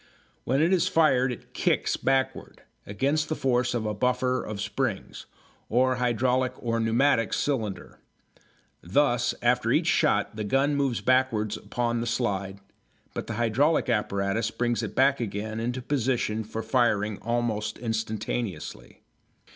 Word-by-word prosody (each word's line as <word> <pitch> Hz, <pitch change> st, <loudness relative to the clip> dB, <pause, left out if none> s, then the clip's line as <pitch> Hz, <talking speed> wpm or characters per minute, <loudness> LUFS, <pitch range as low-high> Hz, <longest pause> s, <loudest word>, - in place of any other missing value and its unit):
When 135 Hz, +5 st, +2 dB
it 170 Hz, +4 st, +3 dB
is 180 Hz, -1 st, +3 dB
fired 130 Hz, -7 st, +3 dB
it 120 Hz, -, -10 dB
"kicks" -, -, +1 dB
backwards, 135 Hz, 0 st, -1 dB, 0.3 s
against 140 Hz, +9 st, 0 dB
the 155 Hz, -, 0 dB
force 125 Hz, -3 st, +1 dB
of 115 Hz, -2 st, -2 dB
a 105 Hz, -, -1 dB
buffer 125 Hz, +3 st, 0 dB
of 105 Hz, -1 st, -6 dB
springs, -, -, -3 dB, 0.4 s
or 130 Hz, +3 st, +3 dB
a -, -, -4 dB
hydraulic 125 Hz, +1 st, +1 dB
or 115 Hz, -1 st, -1 dB
pneumatic 115 Hz, +1 st, +2 dB
cylinder. 110 Hz, -9 st, -2 dB, 0.8 s
Thus 120 Hz, +5 st, +1 dB
after -, -, +2 dB
each -, -, +2 dB
shot -, -, +2 dB
the 105 Hz, -, -3 dB
gun 135 Hz, +7 st, +1 dB
moves 135 Hz, -4 st, 0 dB
backwards 125 Hz, -5 st, +2 dB
upon 120 Hz, -1 st, -2 dB
the 120 Hz, -, -3 dB
slide, 100 Hz, -5 st, -2 dB, 0.5 s
but -, -, -5 dB
the 115 Hz, -, -3 dB
hydraulic 120 Hz, +7 st, +2 dB
apparatus 105 Hz, 0 st, 0 dB
brings 120 Hz, 0 st, -1 dB
it 105 Hz, -2 st, -5 dB
back 135 Hz, +1 st, +3 dB
again 110 Hz, 0 st, -4 dB
into 120 Hz, +2 st, -3 dB
position 120 Hz, -5 st, 0 dB
for 110 Hz, +1 st, -5 dB
firing 110 Hz, -5 st, +1 dB
almost 115 Hz, -2 st, -1 dB
instantaneously. 110 Hz, -4 st, -4 dB
120 Hz, 140 wpm, -26 LUFS, 110-130 Hz, 0.8 s, it